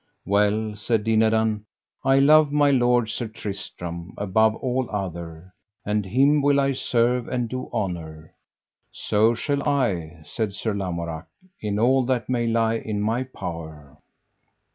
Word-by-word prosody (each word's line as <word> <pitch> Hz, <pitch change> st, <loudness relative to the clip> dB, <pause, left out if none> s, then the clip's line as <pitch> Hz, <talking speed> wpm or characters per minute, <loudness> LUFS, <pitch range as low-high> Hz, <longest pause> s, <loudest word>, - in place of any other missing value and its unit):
Well, 105 Hz, +2 st, +1 dB
said 110 Hz, 0 st, 0 dB
Dinadan, 110 Hz, -1 st, +2 dB, 0.4 s
I 135 Hz, 0 st, +4 dB
love 150 Hz, +2 st, +6 dB
my 145 Hz, -1 st, +4 dB
lord 120 Hz, -3 st, +3 dB
Sir 120 Hz, -, -3 dB
Tristram, 90 Hz, -5 st, -7 dB
above 110 Hz, +2 st, +2 dB
all 130 Hz, 0 st, -2 dB
other, 85 Hz, -3 st, -6 dB, 0.3 s
and 105 Hz, -1 st, -1 dB
him 140 Hz, +8 st, +3 dB
will 140 Hz, 0 st, +3 dB
I 140 Hz, 0 st, +2 dB
serve 125 Hz, -1 st, +1 dB
and 125 Hz, -2 st, -1 dB
do 130 Hz, +2 st, -5 dB
honour. 80 Hz, -5 st, -4 dB, 0.6 s
So 110 Hz, +3 st, +2 dB
shall 140 Hz, +4 st, -1 dB
I, 90 Hz, -, -1 dB
said 105 Hz, +5 st, -3 dB
Sir 105 Hz, +2 st, -2 dB
Lamorak, 85 Hz, -5 st, -4 dB, 0.3 s
in 105 Hz, -1 st, -2 dB
all 130 Hz, +4 st, +3 dB
that 125 Hz, -2 st, -1 dB
may 120 Hz, -2 st, 0 dB
lie 115 Hz, 0 st, +1 dB
in 110 Hz, -2 st, -4 dB
my 115 Hz, +5 st, 0 dB
power. 80 Hz, -, -8 dB
110 Hz, 140 wpm, -24 LUFS, 95-125 Hz, 0.6 s, love